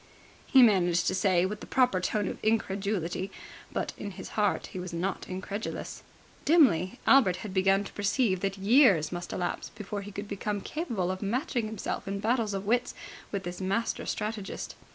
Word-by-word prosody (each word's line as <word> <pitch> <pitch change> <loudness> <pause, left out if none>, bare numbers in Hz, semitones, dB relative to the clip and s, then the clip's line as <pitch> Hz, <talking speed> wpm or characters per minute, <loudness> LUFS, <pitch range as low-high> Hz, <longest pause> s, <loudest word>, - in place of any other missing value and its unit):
he 265 -2 +7
managed 180 -6 +4
to - - +1
say 185 -1 +3
with 205 +2 -3
the - - -10
proper 250 -8 +3
note 210 -1 0
of - - -5
incredulity, 195 -4 0 0.4
but - - -2
in 205 - -4
his 190 -1 -8
heart 210 -2 0
he 185 - -4
was 180 0 -5
not 175 +3 -3
incredulous. 190 +3 -5 0.4
Dimly, 245 - +4
Albert 235 -10 +6
had 195 - -6
begun 195 +1 +3
to - - -10
perceive 205 -1 +1
that 195 +1 -2
years 200 - +5
must 175 0 -5
elapse 180 - -3
before 210 -1 -6
he 205 +1 -8
could 200 +1 -6
become 205 +1 -3
capable 220 - -2
of 185 - -5
matching 235 +2 -1
himself 210 -2 -4
in 200 0 -2
battles 220 -1 0
of 195 +1 -4
wits 245 +4 +1 0.4
with 200 -2 -3
this 175 +1 -6
master 195 +5 -1
strategist. 210 -2 -4
200 Hz, 175 wpm, -29 LUFS, 185-220 Hz, 0.4 s, he